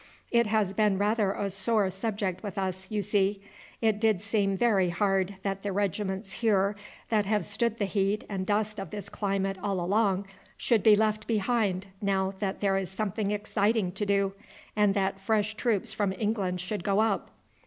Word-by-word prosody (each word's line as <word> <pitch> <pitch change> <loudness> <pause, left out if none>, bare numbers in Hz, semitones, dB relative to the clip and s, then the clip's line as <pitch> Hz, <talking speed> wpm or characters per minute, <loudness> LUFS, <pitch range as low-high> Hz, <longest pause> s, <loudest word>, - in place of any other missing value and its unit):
It 235 -2 +4
has 210 -3 +1
been 210 -1 +2
rather 205 0 +2
a 205 - -2
sore 205 +1 +2
subject 195 -1 -2
with 205 -1 -6
us, 190 -1 -3
you 210 -1 -1
see. 200 -1 +1 0.4
It 220 -2 +2
did 215 -4 +2
seem 200 -2 +1
very 195 -5 +3
hard 195 +1 +1
that 195 -1 -2
the 205 - -2
regiments 195 0 -2
here 205 -2 +2 0.3
that 210 -3 +2
have 210 0 +1
stood 235 -2 0
the 205 - 0
heat 200 +1 0
and 195 -2 -3
dust 210 +2 0
of 195 -4 -5
this 205 +2 -6
climate 195 -2 -1
all 195 -2 -1
along 195 +1 +1 0.3
should 230 -4 +2
be 215 +1 +7
left 215 0 0
behind 210 -3 +1 0.2
now 195 -1 +1
that 195 -2 -2
there 195 -1 +2
is 190 -2 -2
something 200 +1 -2
exciting 210 -1 +1
to 195 +3 -3
do, 200 -1 +2 0.4
and 210 -2 +3
that 195 -1 0
fresh 210 +1 +1
troops 215 -2 0
from 200 -2 0
England 195 -3 -1
should 180 0 -4
go 200 +3 +2
up." 220 -3 +1
200 Hz, 180 wpm, -28 LUFS, 195-215 Hz, 0.4 s, be